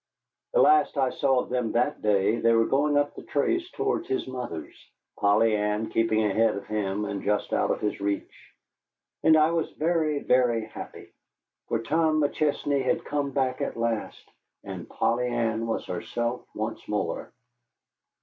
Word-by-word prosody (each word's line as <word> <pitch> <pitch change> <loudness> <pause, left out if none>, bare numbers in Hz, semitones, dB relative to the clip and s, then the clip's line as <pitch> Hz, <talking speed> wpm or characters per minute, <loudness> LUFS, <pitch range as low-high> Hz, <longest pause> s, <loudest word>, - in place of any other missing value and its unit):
The - - +5
last 380 - +4
I 130 -2 +2
saw 135 -2 +2
of - - -9
them 125 -3 -1
that 125 +5 0
day 105 +1 +2
they 115 0 +4
were 115 0 +4
going 145 +3 +2
off 145 0 +2
up - - -29
the - - -8
trace 345 - -1
towards 410 -4 -2
his 390 0 -1
mother's, 120 - -6 0.4
Polly 105 +2 +4
Ann 105 +1 -1
keeping 110 -1 +2
ahead 110 +1 +2
of 100 - -6
him 105 -1 -2
and 100 -1 -4
just 105 0 -1
out - - +1
of - - -1
his 105 - -2
reach. 100 0 -4 0.7
And 160 0 +6
I 155 +1 +4
was 165 -1 0
very, 155 -2 +1
very 120 -3 +2
happy. 110 - -10 0.5
For 115 0 -1
Tom 155 +4 +2
McChesney 145 -1 0
had 165 +6 0
come 145 -1 -1
back 130 -2 -1
at - - -3
last, 115 -2 -3 0.4
and - - -7
Polly 125 +1 0
Ann 115 -1 -1
was 115 - -2
herself 120 +2 -3
once - - -3
more. - - -2
120 Hz, 170 wpm, -26 LUFS, 110-145 Hz, 0.7 s, And